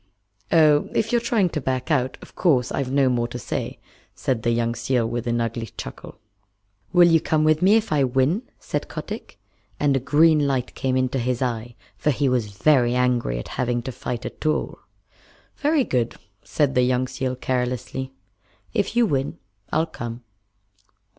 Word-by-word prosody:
"Oh, 150 -2 +5
if 220 - +1
you're 240 -1 +3
trying 225 -6 +2
to 155 - -3
back 130 +3 -2
out, 130 -3 +1
of - - -14
course 130 -9 +2
I've 130 -2 -2
no 140 -1 +3
more 120 -2 +1
to 120 - -6
say," - - -4 0.4
said 125 -4 -1
the 115 - 0
young 115 0 +1
seal 120 0 0
with 120 0 -3
an 120 0 +1
ugly 115 0 -2
chuckle. 60 - -8 0.7
"Will 175 -1 +7
you 165 -2 +4
come 155 -1 +1
with 155 0 +3
me 195 +4 +6
if 225 -1 +1
I 145 -2 +3
win?" 130 - +2 0.2
said - - -3
Kotick. - - -7 0.4
And 145 -2 +2
a - - +2
green 150 +3 +4
light 130 -3 -1
came 130 -1 -1
into 130 +1 0
his 125 0 -1
eye, 120 -1 -3 0.2
for - - 0
he 140 0 +1
was 125 -5 +1
very 125 -1 +4
angry 125 - +1
at - - -6
having 120 -1 0
to 130 - -4
fight 120 0 -5
at - - -7
all. 155 0 -1 0.8
"Very 295 -1 +2
good," 120 - -1 0.3
said 145 -3 0
the 125 - +3
young 125 0 +1
seal 130 0 -3
carelessly. 125 +1 -2 0.6
"If 205 0 0
you 240 -1 +5
win, 140 -8 -1 0.3
I'll 160 +2 +2
come." 120 -6 -7
130 Hz, 180 wpm, -23 LUFS, 120-155 Hz, 0.8 s, Will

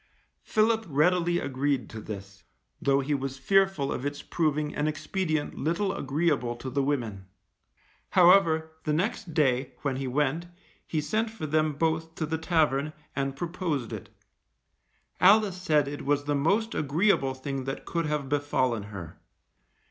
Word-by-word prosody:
Philip 220 0 +2
readily 175 +4 +3
agreed 135 -4 -1
to 110 - -7
this, 100 -2 -8 0.4
though 140 0 +3
he 145 +2 -1
was 135 -1 -2
fearful 195 -3 +2
of - - -3
its 145 0 -4
proving 150 -2 0
an 150 - 0
expedient 155 0 -2
little 180 +6 -1
agreeable 135 -4 0
to 130 +2 -6
the 140 +2 +1
women. 115 -9 -2 0.8
However, 170 -3 +5
the 150 - 0
next 185 0 -2
day, 130 -3 +2
when 135 -3 0
he 135 0 -3
went, 150 +5 0 0.4
he 155 - -1
sent 215 +10 0
for 220 -7 -6
them 155 0 +1
both 160 +2 -1
to 160 - -2
the 160 +1 -2
tavern, 155 -3 +1 0.2
and 135 -1 -1
proposed 165 - -3
it. - - -7 1.1
Alice 195 -1 +5
said 150 -5 +3
it 145 +1 -5
was 145 +1 +1
the 145 0 -1
most 200 +11 +1
agreeable 145 -2 +2
thing 135 0 -4
that 135 0 -5
could 165 -2 -1
have 150 -2 -1
befallen 130 -5 0
her. 95 -7 -9
150 Hz, 150 wpm, -28 LUFS, 135-170 Hz, 1.1 s, However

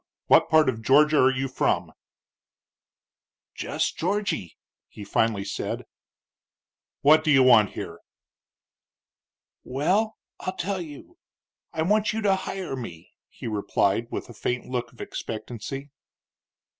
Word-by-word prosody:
What - - +5
part 155 0 +5
of 115 -3 -1
Georgia 150 +6 +5
are 130 - +6
you 135 +1 -2
from?" 130 - 0 1.6
"Jess - - -1
Georgy," 185 - -2 0.3
he 105 - -10
finally 100 0 0
said. - - -4 1.2
"What 155 +2 +6
do 155 - 0
you 135 -3 +6
want 115 -5 +6
here?" - - -6 1.6
"Well, 185 - 0 0.2
I'll 185 - -4
tell 190 +1 -2
you. 150 -4 -11 0.5
I 160 - -1
want 210 +5 +2
you 220 - -2
to 195 -2 +4
hire 190 -5 -4
me," 90 -11 -8 0.2
he - - -11
replied, 105 0 0
with - - -5
a 120 - -11
faint 125 +3 -2
look 120 -1 -3
of 120 - -13
expectancy. 120 +5 -6
135 Hz, 125 wpm, -25 LUFS, 115-170 Hz, 1.6 s, are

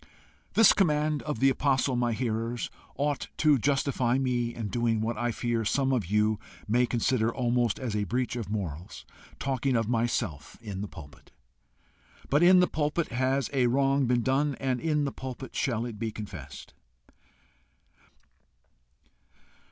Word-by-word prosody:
This 225 -2 +7
command 150 -4 +1
of 150 -5 -3
the 135 +2 +5
apostle, 135 -1 +1
my 120 -1 +1
hearers, 115 0 -2 0.2
ought 145 0 -1
to 150 -3 +4
justify 135 -2 +1
me 125 -3 0
in 115 -3 -4
doing 115 +1 0
what 110 +2 -1
I 120 +2 -1
fear 115 0 -1
some 135 +5 +1
of 115 -9 0
you 105 +2 +2 0.3
may 120 +3 +3
consider 120 -1 +1
almost 120 -3 0
as 120 -5 -3
a 105 -1 0
breach 125 +4 -1
of 115 -6 -4
morals 90 -6 -5 0.3
talking 135 -1 -1
of 115 -2 +1
myself 115 - -2
in 100 -4 -6
the 105 - -4
pulpit. 75 -6 -13 1.0
But 145 +3 +4
in 180 +1 +7
the 180 - +4
pulpit 150 +2 -1
has 130 +2 0
a 130 -3 +3
wrong 135 +1 +2
been 120 -1 +2
done, 135 +2 +1
and 130 -2 -2
in 150 -2 +1
the 140 - -2
pulpit 130 0 -8
shall 120 -3 0
it 115 -4 -7
be 115 -1 -2
confessed. 85 -11 -9
120 Hz, 150 wpm, -28 LUFS, 110-135 Hz, 1.0 s, This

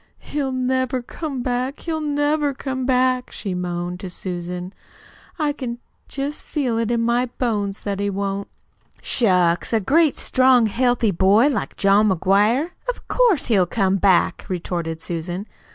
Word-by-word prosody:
"He'll 280 -2 -3
never 255 0 0
come 275 -1 -5
back, 255 +3 -2
he'll 320 -2 -2
never 290 -1 0
come 260 -1 -3
back," 255 -1 +2
she 195 -4 -4
moaned 180 0 -3
to 190 -2 -6
Susan. 180 +1 -5 0.6
"I 300 -3 0
can 245 -4 -5 0.3
just 280 +2 -4
feel 250 -6 -1
it 230 -1 -1
in 235 -1 +1
my 240 +2 +1
bones 210 -5 -2
that 200 -1 -3
he 200 0 0
won't." 200 0 -3 0.6
"Shucks, 180 -7 +2
a 225 - +4
great, 300 - +3
strong, 255 -2 +4
healthy 240 0 +1
boy 200 - +4
like 275 - -3
John 200 +2 +4
McGuire! 205 - +2 0.2
Of - - -4
course, 465 - +3
he'll 195 -6 +3
come 195 0 +1
back," 190 -2 +2
retorted 170 -3 -3
Susan. 175 +3 -4
230 Hz, 150 wpm, -21 LUFS, 190-260 Hz, 0.6 s, a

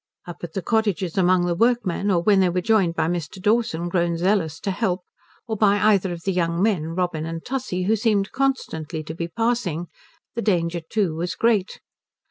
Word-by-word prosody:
Up 175 - -8
at 165 -2 -6
the 195 - -3
cottages 205 -6 0
among 185 -1 +3
the 175 - +1
workmen, 205 -2 +1
or 175 -3 +2
when 200 -1 +4
they 185 -1 +4
were 180 +1 0
joined 185 -4 +2
by 160 - +1
Mr. 170 0 -3
Dawson, 210 -4 +1
grown 170 -1 0
zealous 170 -4 +1
to 195 - -1
help, 185 -3 -1 0.4
or 220 - -2
by 205 -1 +3
either 200 -3 +3
of 170 -1 -6
the 195 - 0
young 170 -1 0
men 175 -6 0
Robin 175 -3 -1
and 165 0 -6
Tussie, 250 -9 -2
who 215 +4 +2
seemed 210 -2 +1
constantly 165 - -2
to 155 - -6
be 170 +1 -4
passing, 180 -5 -1 0.4
the 235 - -3
danger 175 -5 +1
too 180 +1 -1
was 170 +3 -3
great. 220 -5 +1
185 Hz, 195 wpm, -23 LUFS, 170-215 Hz, 0.4 s, when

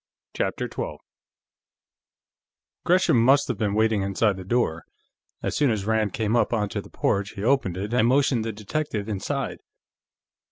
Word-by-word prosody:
CHAPTER - - -1
12 75 - -5 1.9
Gresham 175 -10 +4
must 135 +3 +4
have 120 -5 -2
been 105 -2 0
waiting 110 -1 +2
inside 100 +2 +1
the 95 - -8
door; 95 -6 0 0.6
as - - -2
soon 145 -3 +3
as 105 -4 -1
Rand 110 -2 +1
came 110 0 0
up 115 -1 +2
onto 105 -3 -1
the - - -15
porch, 100 0 -1
he 100 - -6
opened 115 -8 +1
it, 105 +4 -4
and 120 -2 +3
motioned 130 -2 +2
the 115 - -2
detective 110 0 -3
inside. 100 -3 -3
110 Hz, 155 wpm, -25 LUFS, 100-120 Hz, 1.9 s, Gresham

